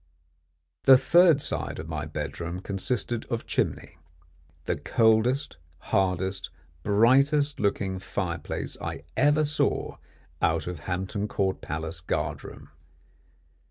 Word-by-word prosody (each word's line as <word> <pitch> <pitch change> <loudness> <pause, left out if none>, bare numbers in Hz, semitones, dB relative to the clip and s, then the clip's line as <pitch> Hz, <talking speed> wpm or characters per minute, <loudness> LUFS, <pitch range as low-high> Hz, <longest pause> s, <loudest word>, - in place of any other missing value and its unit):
The 135 -1 +9
third 170 +3 +5
side - - -3
of 80 - -6
my 75 -1 -4
bedroom 85 +3 -5
consisted 110 +4 -2
of 115 -1 -4
chimney 85 - -2 0.7
the - - 0
coldest, 115 - +2 0.2
hardest, 95 +1 -1 0.3
brightest 135 - +3
looking 95 -2 0
fire 95 -2 -3
place - - -5
I - - -5
ever 145 +3 +4
saw 150 0 0 0.4
out 80 -2 +1
of 90 -3 -5
Hampton 95 +3 -2
Court 95 -2 -1
Palace 80 +2 -4
guardroom. 85 - -4
100 Hz, 110 wpm, -27 LUFS, 90-130 Hz, 0.7 s, The